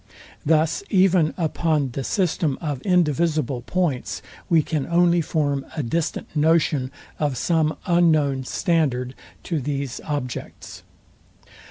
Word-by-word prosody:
Thus 155 - +2
even 185 -5 +4
upon 155 -4 0
the 135 +3 -4
system 160 - 0
of 145 -6 -3
indivisible 155 -6 +1
points, 160 -2 -2 0.3
we 165 -3 +4
can 150 -4 -2
only 175 0 +3
form 145 -3 -1
a 150 - 0
distant 160 +7 -2
notion 150 -3 +2 0.3
of 145 -4 0
some 160 -2 +1
unknown 155 -6 +3
standard 135 -8 0 0.3
to 165 -3 -2
these 140 -2 -3
objects. 140 -5 -5
155 Hz, 115 wpm, -23 LUFS, 140-170 Hz, 0.3 s, even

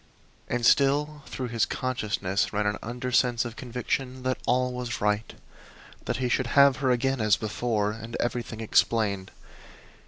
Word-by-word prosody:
And 120 -1 -1
still 145 +3 +3
through 125 -2 -4
his 115 -1 +1
consciousness 105 -6 -1
ran 105 0 0
an 105 0 0
undersense 125 0 0
of 120 -1 -6
conviction 125 +1 -3
that 130 0 -1
all 125 +1 +2
was 125 -2 -4
right 105 +1 0 0.7
that - - -1
he 130 -1 0
should 125 +1 +1
have 140 -2 +7
her 135 -2 0
again 130 +1 +1
as 105 -2 +4
before, 110 -1 -1
and 115 +1 -7
everything 120 -2 -3
explained. 105 -3 +1
120 Hz, 150 wpm, -27 LUFS, 110-130 Hz, 0.7 s, have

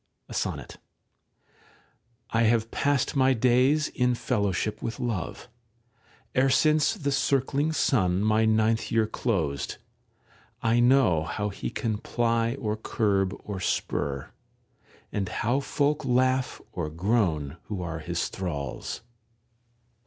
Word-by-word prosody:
[Sonnet.] - - -3 1.5
[I 115 - +2
have 115 0 +2
passed 145 -1 +1
my 130 -1 +4
days 130 +6 +3
in 125 -1 +1
fellowship 105 -3 -1
with 115 - -4
Love 115 -3 -3 0.9
E'er 135 +1 +4
since 155 +3 +3
the 140 -1 -2
circling 140 +2 +1
Sun 100 - +2
my 110 +1 +3
ninth 110 +1 +2
year 115 -1 +3
closed; 90 - -2 0.9
I 115 +1 +3
know 120 - +4
how 105 +6 -2
he 100 - -5
can 110 -3 -2
ply 115 0 0
or 110 -6 -2
curb 100 -3 0
or 100 -2 -5
spur, 70 -6 -2 0.8
And 100 -2 -2
how 120 +6 0
folk 145 +2 0
laugh 130 +1 +1
or 85 -6 -3
groan 85 - 0
who 95 -4 -4
are 80 -2 -4
his 85 +2 -2
thralls. 75 -7 -4
115 Hz, 115 wpm, -27 LUFS, 95-130 Hz, 1.5 s, my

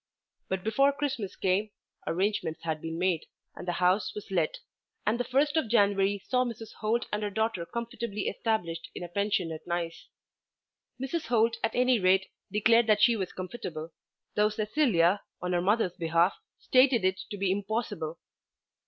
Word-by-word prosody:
But 190 -1 -2
before 275 +7 +3
Christmas 270 -8 -3
came, 195 +3 +1 0.4
arrangements 180 -3 -1
had 160 -2 -2
been 165 0 -4
made, 175 -2 0 0.3
and - - -9
the 175 - 0
house 180 +4 +2
was 210 -2 -8
let, 170 -5 +1 0.5
and 225 +3 +1
the - - +2
first 285 +4 +1
of 315 -7 +2
January 200 -3 +3
saw 250 -1 +3
Mrs. 225 -3 -6
Holt 225 +2 0
and 210 - 0
her 210 - -1
daughter 210 -4 -1
comfortably 235 -3 -4
established 180 -7 -2
in - - -5
a - - -4
pension 200 -1 0
at 160 +1 -8
Nice. 170 -1 -3 0.9
Mrs. 270 +5 -3
Holt 230 -1 +3
at 225 - 0
any 250 -1 +4
rate 190 0 +4 0.3
declared 225 +3 +4
that 210 -1 +4
she 235 0 +6
was 190 -4 -3
comfortable, 175 -5 -6 0.4
though 210 0 +4
Cecilia 210 - +2 0.2
on 180 0 -2
her 175 - +2
mother's 200 -1 +2
behalf 170 +2 +3 0.2
stated 255 -5 +4
it 190 0 +1
to 205 - -5
be 195 -1 +1
impossible. 195 -5 -2
205 Hz, 165 wpm, -29 LUFS, 180-230 Hz, 0.9 s, she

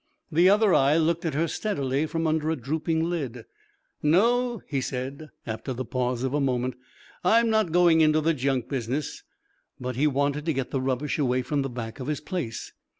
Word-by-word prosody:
The 170 +4 +5
other 205 -1 +4
eye 140 +3 +4
looked 165 +2 +1
at 160 - -1
her 165 +3 +1
steadily 145 -6 -1
from 165 +1 -2
under 155 0 +1
a 160 - +1
drooping 160 +5 -1
lid. 135 -9 -4 0.6
"No," 235 +8 +2
he 140 -3 -2
said, 135 +4 -5 0.2
after 115 +4 -4
the 130 +1 -4
pause 125 0 -1
of 130 0 -1
a 145 - +1
moment, 130 -1 0 0.5
"I'm 225 +5 +4
not 220 -6 +2
going 170 -1 +5
into 155 0 +4
the 165 +2 +2
junk 135 -3 -1
business." 135 +2 -3 0.6
But 125 -1 -4
he 150 +3 +3
wanted 145 +2 0
to 160 - +2
get 135 -2 -3
the 135 - -1
rubbish 135 +3 -1
away 130 -2 +1
from 145 +3 -1
the 135 - -2
back 120 0 -6
of 130 - -5
his 150 -1 -1
place. 155 - -5
150 Hz, 195 wpm, -26 LUFS, 130-165 Hz, 0.6 s, The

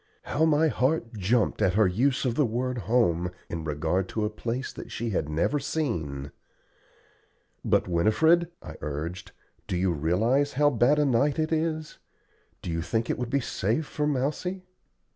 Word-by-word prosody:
How 155 +2 +1
my 160 0 +4
heart 130 -3 0
jumped 110 +3 +1
at 95 0 +2
her 110 0 +5
use 125 +10 +1
of 125 - +1
the 150 - +2
word 125 +1 -1
"home" 90 -8 +2 0.2
in 85 -1 -3
regard 80 +5 -1
to 110 -1 -1
a 105 - -2
place 120 +4 -4
that - - -9
she 115 -1 -3
had 75 -6 -1
never 80 - +1
seen. 80 - -3 1.3
"But, - - +2
Winifred," 160 - +3
I - - -9
urged, 80 +5 -5 0.4
"do 90 - -1
you 90 0 +1
realize 110 - +1
how 145 +2 +3
bad 125 +4 +3
a 150 - +3
night 140 +3 +2
it 155 0 0
is? 155 -1 -2 0.6
Do 85 - -3
you 85 0 -1
think 115 +7 -1
it - - -3
would 125 -2 -3
be 140 +2 +1
safe 115 +6 -1
for 150 0 -2
Mousie?" 150 +7 -1
120 Hz, 170 wpm, -27 LUFS, 90-145 Hz, 1.3 s, her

